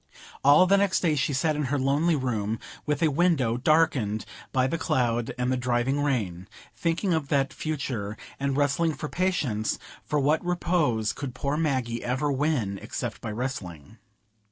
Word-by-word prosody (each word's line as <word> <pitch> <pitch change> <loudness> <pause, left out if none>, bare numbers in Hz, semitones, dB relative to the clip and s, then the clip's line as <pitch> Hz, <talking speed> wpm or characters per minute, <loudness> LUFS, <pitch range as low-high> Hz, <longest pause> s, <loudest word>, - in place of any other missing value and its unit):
All 145 +6 +7
the 195 +2 +4
next 200 -1 +2
day 165 -4 +2
she 145 0 0
sat 150 +3 +1
in 150 -1 -1
her 145 +3 0
lonely 145 +5 +2
room, 115 -5 -1 0.3
with 150 +1 0
a 155 - +4
window 140 -7 +2
darkened 125 -6 +2 0.3
by 130 -1 +2
the 165 +5 -1
cloud 120 -4 0
and 125 0 0
the 130 - +1
driving 125 +3 0
rain, 100 -11 -1 0.3
thinking 170 +2 0
of 160 -3 0
that 140 -2 +1
future, 125 -9 -3 0.2
and 140 0 0
wrestling 145 +3 +2
for 150 - -5
patience; 150 - 0 0.3
for 150 - 0
what 150 +4 +2
repose 165 -11 +1
could 130 -4 -6
poor 140 +2 -1
Maggie 130 -7 -1
ever 130 +4 0
win 135 -9 0
except - - -5
by - - -4
wrestling? 105 - -5
135 Hz, 165 wpm, -26 LUFS, 120-155 Hz, 0.3 s, All